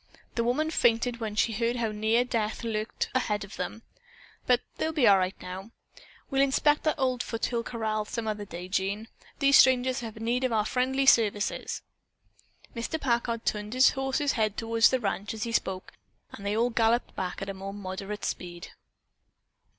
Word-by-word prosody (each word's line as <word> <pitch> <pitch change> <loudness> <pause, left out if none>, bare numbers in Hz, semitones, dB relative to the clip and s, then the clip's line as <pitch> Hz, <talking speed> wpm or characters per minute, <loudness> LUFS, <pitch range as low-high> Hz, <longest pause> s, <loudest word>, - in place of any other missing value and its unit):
The 235 - 0
woman 300 +7 0
fainted 235 -3 +2
when 220 -2 -4
she 225 +1 +2
heard 230 +3 0
how 230 -3 -1
near 220 +3 +2
death 225 -2 -2
lurked 220 -1 -2
ahead 210 -5 0
of 200 - -10
them, 180 +5 -5 0.6
but 250 -1 +4 0.2
they'll 320 - 0
be 295 -6 +3
all 195 -1 +7
right 185 +1 -2
now. 185 +3 -7 0.6
We'll 270 0 +3
inspect 295 +2 +3
that 310 - +2
old 255 -3 0
foothill 235 0 -2
corral 220 -2 -2
some 225 +1 -4
other 210 -1 -2
day, 180 -1 -7
Jean. 200 +4 -2 0.3
These 275 -1 +6
strangers 260 0 +5
have 225 -3 -7
need 240 +3 0
of 255 - +1
our 215 -2 +2
friendly 265 +3 +1
services." 210 -5 +2 0.9
Mr. 235 +7 -3
Packard 235 -3 0
turned 210 +1 -2
his 255 +1 +6
horse's 270 +2 0
head 215 -5 0
toward 225 0 -3
the 260 - +5
ranch 205 -1 -2
as 215 - -4
he 235 - -3
spoke 190 -4 -2 0.4
and 200 - -10
they 205 +1 -1
all 240 +2 +2
galloped 230 +1 +1
back 180 -1 -3
at 195 - -5
a - - -3
moderate 195 +1 -6
speed. 175 0 -5
225 Hz, 175 wpm, -28 LUFS, 210-250 Hz, 0.9 s, all